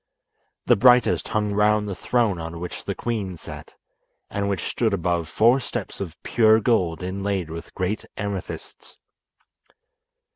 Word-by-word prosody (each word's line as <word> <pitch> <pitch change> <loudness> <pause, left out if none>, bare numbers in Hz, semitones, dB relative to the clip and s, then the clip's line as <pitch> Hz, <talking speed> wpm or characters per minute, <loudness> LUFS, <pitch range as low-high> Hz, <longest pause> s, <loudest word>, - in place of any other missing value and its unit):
The - - +5
brightest 125 +2 +5
hung 105 -1 0
round 105 0 +3
the 100 - -3
throne 110 -2 0
on 80 +1 -6
which 90 +1 -6
the - - -2
queen 105 -7 -3
sat, - - -10 0.6
and 100 0 -1
which 100 -2 -2
stood 110 -4 +1
above 85 -3 -1
four 120 +8 +4
steps 120 -6 -5
of 85 -4 -6
pure 110 -1 +4
gold 95 -7 +1
inlaid 95 -2 -2
with 85 0 -8
great 95 +3 -2
amethysts. 100 -2 -6
100 Hz, 140 wpm, -24 LUFS, 90-110 Hz, 0.6 s, The